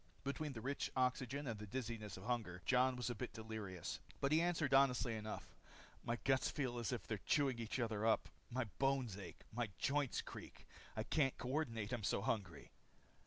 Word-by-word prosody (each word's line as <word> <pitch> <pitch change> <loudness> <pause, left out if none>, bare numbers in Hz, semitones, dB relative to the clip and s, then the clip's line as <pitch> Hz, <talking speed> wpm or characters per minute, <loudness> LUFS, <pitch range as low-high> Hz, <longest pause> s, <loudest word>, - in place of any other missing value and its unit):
Between 140 +2 -2
the 115 - -5
rich 140 +4 -1
oxygen 130 +2 +1
and 115 -5 -2
the 105 - -6
dizziness 115 -3 -3
of 95 - -8
hunger, 110 -7 -1
Jon 130 0 +5
was 125 0 -1
a - - 0
bit 110 - -4
delirious. 110 -5 -4 0.2
But 140 - +2
he 155 +1 +6
answered 165 -5 +2
honestly 130 -3 +5
enough: 110 0 -5 0.5
"My 115 - 0
guts 135 -1 +4
feel 125 -5 -1
as 115 - -1
if 125 - -2
they're 110 -3 -2
chewing 135 -5 +3
each 115 +3 -2
other 110 -3 0
up. 110 0 +4 0.2
My 130 +1 0 0.2
bones 135 -6 +2
ache. 95 -4 -8
My 120 -1 0
joints 140 -2 +1
creak. - - -9 0.3
I 110 - +1
can't 135 +2 +2
coordinate 125 -5 -1
I'm 120 -4 -1
so 100 - +2
hungry." 95 -9 -2
120 Hz, 185 wpm, -41 LUFS, 110-135 Hz, 0.5 s, he